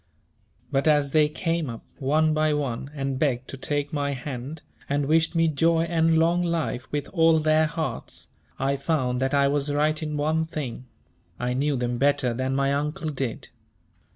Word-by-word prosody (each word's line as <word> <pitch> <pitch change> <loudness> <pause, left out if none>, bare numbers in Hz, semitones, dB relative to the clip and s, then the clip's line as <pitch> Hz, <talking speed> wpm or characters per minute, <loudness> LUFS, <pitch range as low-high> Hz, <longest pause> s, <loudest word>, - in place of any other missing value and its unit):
But 140 +1 +1
as 145 -2 +3
they 150 0 +4
came 165 -1 -2
up, 115 -1 -8
one 155 +3 +2
by 155 -1 +2
one, 135 -2 -3
and 135 -2 -2
begged 130 -4 0
to - - -5
take 145 +2 -3
my 140 -1 -1
hand, 135 +3 -6 0.3
and 145 0 +1
wished 165 +3 +2
me 165 0 +3
joy 165 +2 +2
and 165 -1 +2
long 170 +2 +3
life 165 -7 -2
with 145 -1 -2
all 165 -3 +4
their 155 0 +3
hearts, 160 +1 -5 0.3
I 135 +1 0
found 130 -4 0
that 135 +2 +1
I 140 0 +4
was 145 +1 0
right 150 +2 +1
in 150 -1 -3
one 160 +2 0
thing; 140 -6 -5 0.5
I 125 0 -1
knew 140 +3 0
them 120 -1 -2
better 135 -3 +2
than 130 +2 -1
my 140 0 +1
Uncle 150 +2 -2
did. 135 -5 -4
145 Hz, 180 wpm, -25 LUFS, 135-160 Hz, 0.5 s, they